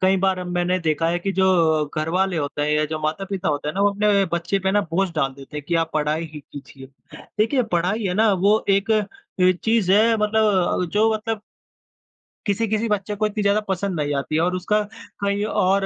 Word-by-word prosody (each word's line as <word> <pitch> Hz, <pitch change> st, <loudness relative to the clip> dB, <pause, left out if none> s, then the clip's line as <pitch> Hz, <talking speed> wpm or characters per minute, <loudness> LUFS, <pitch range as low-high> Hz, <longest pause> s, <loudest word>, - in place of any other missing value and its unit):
कई 190 Hz, +1 st, +3 dB
बार 185 Hz, -1 st, +1 dB
मैंने 180 Hz, +1 st, 0 dB
देखा 165 Hz, 0 st, 0 dB
है 175 Hz, +1 st, 0 dB
कि 195 Hz, +3 st, -3 dB
जो 190 Hz, 0 st, +2 dB, 0.5 s
घरवाले 180 Hz, +3 st, 0 dB
होते 145 Hz, -1 st, -2 dB
हैं 150 Hz, -, 0 dB
या 150 Hz, 0 st, +2 dB
जो 155 Hz, +1 st, -4 dB
माता-पिता 190 Hz, +4 st, -2 dB
होते 145 Hz, 0 st, -2 dB
हैं 150 Hz, -, -4 dB
ना, 195 Hz, -, -1 dB
वो 205 Hz, 0 st, +4 dB
अपने 200 Hz, -1 st, +2 dB
बच्चे 170 Hz, +3 st, 0 dB
पे 190 Hz, 0 st, 0 dB
ना 205 Hz, +1 st, +3 dB
बोझ 190 Hz, +2 st, +1 dB
डाल 135 Hz, -4 st, 0 dB
देते 140 Hz, +2 st, -11 dB
हैं 150 Hz, -, -5 dB
कि 170 Hz, -, 0 dB
आप 160 Hz, -, -22 dB
पढ़ाई 155 Hz, +2 st, 0 dB
ही 150 Hz, -, -8 dB
कीजिए। 135 Hz, -1 st, -12 dB, 0.5 s
देखिए, 245 Hz, +5 st, +2 dB
पढ़ाई 195 Hz, +2 st, -1 dB
है 180 Hz, -, -1 dB
ना 215 Hz, +1 st, +3 dB
वो 200 Hz, +3 st, +2 dB
एक 200 Hz, +3 st, +1 dB
अ, 215 Hz, -, +4 dB, 0.6 s
चीज़ 220 Hz, -5 st, +2 dB
है 225 Hz, +2 st, +4 dB
मतलब 210 Hz, -4 st, +1 dB
जो 220 Hz, +2 st, +3 dB
मतलब 220 Hz, 0 st, -3 dB, 1.1 s
किसी-किसी 220 Hz, +2 st, 0 dB
बच्चे 205 Hz, 0 st, -1 dB
को -, -, +4 dB
इतनी 210 Hz, 0 st, -3 dB
ज़्यादा 200 Hz, +1 st, +3 dB
पसंद 190 Hz, -2 st, -2 dB
नहीं 145 Hz, 0 st, -1 dB
आती 140 Hz, +2 st, -2 dB
है 160 Hz, -, +2 dB
और 180 Hz, +1 st, +1 dB
उसका 210 Hz, +4 st, 0 dB, 0.4 s
कई 200 Hz, +1 st, 0 dB, 0.2 s
और 195 Hz, +1 st, +2 dB
190 Hz, 210 wpm, -22 LUFS, 165-210 Hz, 1.1 s, वो